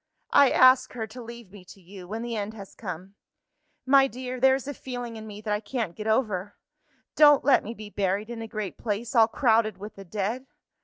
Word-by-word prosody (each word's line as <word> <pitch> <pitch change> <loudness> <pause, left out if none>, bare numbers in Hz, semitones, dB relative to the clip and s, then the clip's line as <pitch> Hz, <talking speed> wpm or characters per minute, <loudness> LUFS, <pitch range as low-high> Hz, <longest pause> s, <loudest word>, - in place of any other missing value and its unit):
I 280 - +7
ask 255 0 +5
her 230 -3 -4
to 230 +4 -11
leave 235 -4 -11
me 200 -2 -13
to 195 - -15
you, 185 0 -12
when 220 +4 -5
the 235 -1 -4
end 210 +1 -4
has 200 -3 -11
come. 185 +4 -8 0.7
My 270 +1 +5
dear, 255 +1 -6
there 265 +1 +5
is 270 -1 -6
a 285 - -3
feeling 245 -3 -7
in 220 0 -9
me 210 0 -9
that 210 -1 -2
I 210 - 0
can't 220 -5 -4
get 215 - -6
over. 210 -4 0 0.6
Don't 295 -3 +6
let 280 - +4
me 225 +3 -7
be 210 -1 -10
buried 200 +3 -1
in 230 -1 -6
a 225 - -6
great 215 -4 -6
place 220 +1 -3
all 225 -3 +6
crowded 225 -4 +2
with 205 +2 -9
the 195 - -9
dead! 215 +7 -4
220 Hz, 220 wpm, -26 LUFS, 205-250 Hz, 0.7 s, I